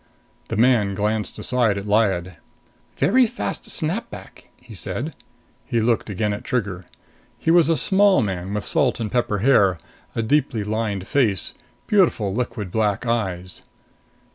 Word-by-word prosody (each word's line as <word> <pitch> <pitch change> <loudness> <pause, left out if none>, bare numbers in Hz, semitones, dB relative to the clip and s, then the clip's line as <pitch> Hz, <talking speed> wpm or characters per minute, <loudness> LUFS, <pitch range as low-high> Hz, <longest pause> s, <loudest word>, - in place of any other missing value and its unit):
The - - -3
man 110 -4 +3
glanced 105 +1 -2
aside 120 -5 +1
at 100 - -5
Lyad. 95 -5 +1 0.6
"Very 250 +4 +4
fast 105 - -4
snap - - -1
back!" - - -12
he - - -14
said. - - -4 0.5
He 115 - -1
looked 115 0 +1
again 105 +1 -1
at 100 - -6
Trigger. 100 -7 -2 0.5
He 165 - 0
was 170 -2 +5
a 165 - +3
small 195 - +4
man 95 -2 -3
with 105 - -2
salt - - +1
and 110 -2 -3
pepper 120 -4 0
hair, 100 -9 +4 0.4
a 115 - 0
deeply 130 -3 +1
lined 105 -2 -2
face, 110 -9 0 0.3
beautiful 165 - +2
liquid 115 -4 -3
black 105 +1 0
eyes. 95 -6 -2
110 Hz, 145 wpm, -22 LUFS, 100-125 Hz, 0.6 s, was